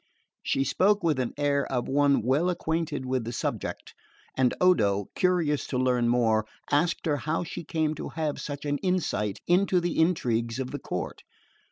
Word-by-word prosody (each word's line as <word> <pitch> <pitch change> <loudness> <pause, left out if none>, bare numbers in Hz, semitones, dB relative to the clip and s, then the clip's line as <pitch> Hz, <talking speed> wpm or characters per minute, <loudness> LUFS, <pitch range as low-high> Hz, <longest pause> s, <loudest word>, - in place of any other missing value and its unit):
She 135 - 0
spoke 205 +7 +2
with 160 -4 +2
the 125 -2 -1
air 145 -1 +1
of 125 -2 -1
one 140 -2 +3
well 140 +9 +2
acquainted 160 -5 -2
with 130 -1 -1
the 115 - -4
subject, - - -4 0.4
and 130 -2 +3
Odo, 100 - +3
curious 175 -6 +1
to 130 - -2
learn 125 -2 +2
more, 110 -3 +2 0.2
asked 165 +4 +1
her 150 -3 +1
how 155 +6 -1
she 175 - -6
came 160 -2 -1
to 155 - -6
have 155 -3 -3
such 145 0 -6
an 145 0 -1
insight 165 - -1
into 180 +1 +3
the 175 -1 -1
intrigues 120 -9 +1
of 130 -1 -4
the - - -4
court. - - -5
145 Hz, 175 wpm, -27 LUFS, 125-170 Hz, 0.4 s, one